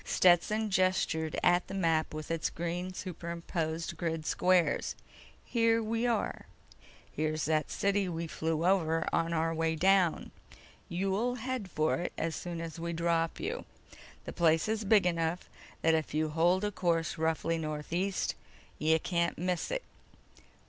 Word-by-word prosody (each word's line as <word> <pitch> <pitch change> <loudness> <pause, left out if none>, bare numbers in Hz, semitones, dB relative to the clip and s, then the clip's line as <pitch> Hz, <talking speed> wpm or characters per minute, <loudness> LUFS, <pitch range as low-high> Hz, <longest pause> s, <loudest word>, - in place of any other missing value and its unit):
Stetson 205 +5 +3
gestured 185 -4 +1
at 175 0 +4
the - - -6
map 165 -4 +1
with 155 +1 -6
its 165 -1 0
green 175 +2 -3
superimposed 170 -2 -4
grid 165 -2 -2
squares. 180 0 +2 0.5
"Here 230 -1 +2
we 230 +2 0
are. 230 -3 -1 0.6
Here's 155 0 -1
that 155 -1 +1
city 200 -1 +1
we 170 -1 -3
flew 160 0 -2
over 165 -4 +2
on 165 0 +1
our 165 0 +1
way 165 0 0
down. 185 0 +3 0.6
You'll 195 +7 0
head 250 -4 -4
for 155 -2 +1
it 175 - -4
as 165 -1 -1
soon 170 -2 -5
as 165 -1 -6
we 170 0 -3
drop 165 0 0
you. 445 +7 -3 0.6
The - - -6
place 165 -1 +3
is 220 0 -1
big 205 -2 +5
enough 170 0 0 0.4
that 160 - +4
if 160 -1 -1
you 155 0 +1
hold 175 +5 +2
a 205 - 0
course 165 -4 0
roughly 160 +1 0
northeast 160 +5 -2 0.5
you 160 +1 +4
can't 170 0 0
miss 180 0 -1
it. - - -2
170 Hz, 150 wpm, -31 LUFS, 160-190 Hz, 0.6 s, big